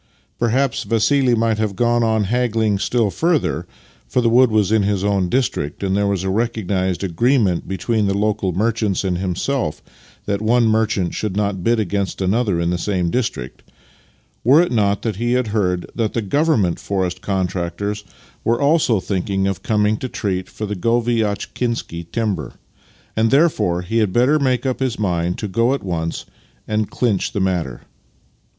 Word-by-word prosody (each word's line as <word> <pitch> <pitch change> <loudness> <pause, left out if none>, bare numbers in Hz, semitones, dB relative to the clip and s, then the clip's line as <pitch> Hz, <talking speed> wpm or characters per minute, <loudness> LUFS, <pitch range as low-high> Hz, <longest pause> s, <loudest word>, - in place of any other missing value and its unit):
Perhaps 125 +3 +1
Vassih 120 +2 +2
might 110 -1 +1
have 105 -3 -1
gone 120 +2 +2
on 110 -1 +2
haggling 110 -2 +1
still 115 -1 +1
further 165 - 0 0.4
(for - - 0
the 115 -2 +2
wood 125 +1 +6
was 110 -2 +2
in 110 -1 +4
his 100 -1 0
own 100 -3 +1
district, 100 - -1
and 95 -1 0
there 100 0 +1
was 100 -2 -1
a 95 - -1
recognized 100 -4 -1
agreement 100 0 +1
between 105 +3 0
the 100 0 0
local 105 -2 0
merchants 105 +1 0
and 90 -2 -1
himself 95 - -2 0.4
that 100 0 -1
one 115 +2 +3
merchant 110 -5 +1
should 105 -2 -3
not 100 -3 -1
bid 115 +2 +2
against 100 -1 -2
another 100 -1 +1
in 85 0 0
the 90 - -1
same 90 -2 -1
district), 115 - -3 0.8
were 135 +6 +6
it 175 - +2
not 100 -4 +1
that 110 -4 -2
he 120 +2 0
had 125 -3 +1
heard 90 -4 0
that 115 -3 -1
the 115 - 0
Government 115 - +1
forest 95 -3 -2
contractors 95 +2 -2 0.4
were 115 +1 +1
also 145 -7 +3
thinking 95 0 -1
of 95 -1 -2
coming 105 0 +1
to 130 - -5
treat 95 -5 -3
for 110 - -5
the 105 0 -3
Goviatchkinsky 115 -4 -1
timber, 100 - -2 0.6
and 110 +1 +2
therefore 110 - +2
he 115 +6 0
had 105 -4 +1
better 130 +8 +3
make 130 -2 0
up 130 -1 -1
his 130 -2 -1
mind 90 -4 -1
to 105 - -3
go 115 +7 +2
at - - -7
once 85 -3 -3 0.4
and 110 -1 -1
clinch 110 -6 0
the - - -1
matter. 90 -10 -1
105 Hz, 170 wpm, -20 LUFS, 95-120 Hz, 0.8 s, wood